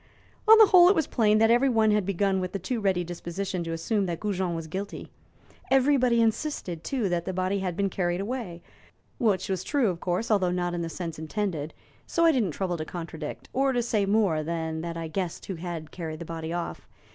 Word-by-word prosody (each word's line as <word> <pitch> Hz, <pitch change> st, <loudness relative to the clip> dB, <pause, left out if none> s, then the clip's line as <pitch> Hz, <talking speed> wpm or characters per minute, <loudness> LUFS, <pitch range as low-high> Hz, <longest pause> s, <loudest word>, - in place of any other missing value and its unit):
"On 445 Hz, +1 st, +10 dB
the 440 Hz, -, +9 dB
whole, 360 Hz, -2 st, +7 dB
it 400 Hz, -, +4 dB
was 320 Hz, -, +2 dB
plain 215 Hz, -5 st, +3 dB
that 225 Hz, +1 st, +4 dB
everybody 235 Hz, -3 st, +4 dB
had 210 Hz, -3 st, +1 dB
begun 195 Hz, 0 st, +1 dB
with 185 Hz, +1 st, -4 dB
a -, -, +2 dB
too 225 Hz, +5 st, -3 dB
ready 190 Hz, -3 st, +1 dB
disposition 175 Hz, +2 st, -4 dB
to 165 Hz, -, -4 dB
assume 195 Hz, +5 st, -1 dB
that 170 Hz, -2 st, -3 dB
Goujon 190 Hz, -4 st, -1 dB
was 165 Hz, -1 st, -4 dB
guilty. 190 Hz, +6 st, -6 dB, 0.6 s
Everybody 260 Hz, -3 st, +4 dB
insisted, 220 Hz, -, -2 dB
too, 250 Hz, -7 st, -1 dB
that 170 Hz, -1 st, -1 dB
the 190 Hz, -, -3 dB
body 185 Hz, +2 st, 0 dB
had 180 Hz, -2 st, -3 dB
been 200 Hz, -1 st, +1 dB
carried 175 Hz, -2 st, -1 dB
away 200 Hz, -6 st, -5 dB, 0.6 s
which 205 Hz, -7 st, +1 dB
was 190 Hz, -2 st, -2 dB
true, 275 Hz, -4 st, +1 dB
of 170 Hz, -, -7 dB
course, 180 Hz, +6 st, -1 dB
although 190 Hz, -4 st, +3 dB
not 175 Hz, 0 st, -1 dB
in 175 Hz, -, -2 dB
the 165 Hz, -, -3 dB
sense 165 Hz, -2 st, -6 dB
intended 160 Hz, -2 st, -3 dB, 0.3 s
so 335 Hz, -, +2 dB
I 330 Hz, -, +7 dB
didn't 240 Hz, -, +1 dB
trouble 180 Hz, +2 st, -2 dB
to 155 Hz, -, -3 dB
contradict, 165 Hz, -3 st, -7 dB
or 270 Hz, 0 st, +2 dB
to 245 Hz, -1 st, +1 dB
say 215 Hz, -4 st, 0 dB
more 200 Hz, -7 st, +2 dB
than 160 Hz, 0 st, -3 dB
that 170 Hz, 0 st, -5 dB
I 165 Hz, -1 st, -4 dB
guessed 175 Hz, +1 st, -4 dB
who 195 Hz, -, -4 dB
had 165 Hz, -2 st, -6 dB
carried 160 Hz, -3 st, -5 dB
the 170 Hz, -, -7 dB
body 160 Hz, 0 st, -5 dB
off. 175 Hz, 0 st, -4 dB
190 Hz, 215 wpm, -27 LUFS, 170-220 Hz, 0.6 s, On